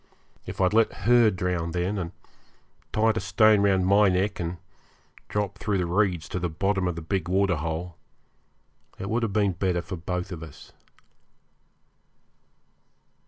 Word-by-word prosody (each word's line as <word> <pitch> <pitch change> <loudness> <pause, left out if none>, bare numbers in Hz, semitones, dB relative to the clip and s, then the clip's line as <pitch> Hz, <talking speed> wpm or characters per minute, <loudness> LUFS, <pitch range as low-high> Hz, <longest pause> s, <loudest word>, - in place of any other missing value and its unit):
If - - -7
I'd 95 +1 +2
let 115 0 +4
her 120 -1 +6
drown 90 -3 -2
then, 90 +3 -1
and 85 -2 -4 0.8
tied 110 0 +2
a - - +2
stone 110 -2 +4
round 95 -2 +3
my 100 +1 +5
neck 95 +2 0
and 85 0 -3 0.7
dropped 105 -1 -2
through 105 -3 0
the 90 - 0
reeds 90 -2 0
to 90 - -3
the 90 0 -2
bottom 95 +3 0
of 90 - -2
the 85 - -6
big 90 +1 -2
waterhole, 90 -3 -1 1.0
it 95 - -5
would 120 +2 +1
have 110 -4 -1
been 100 -2 +2
better 90 -1 -1
for 95 0 -6
both 90 +3 -4
of 85 -3 -6
us. 80 - -12
95 Hz, 155 wpm, -26 LUFS, 90-105 Hz, 1.0 s, her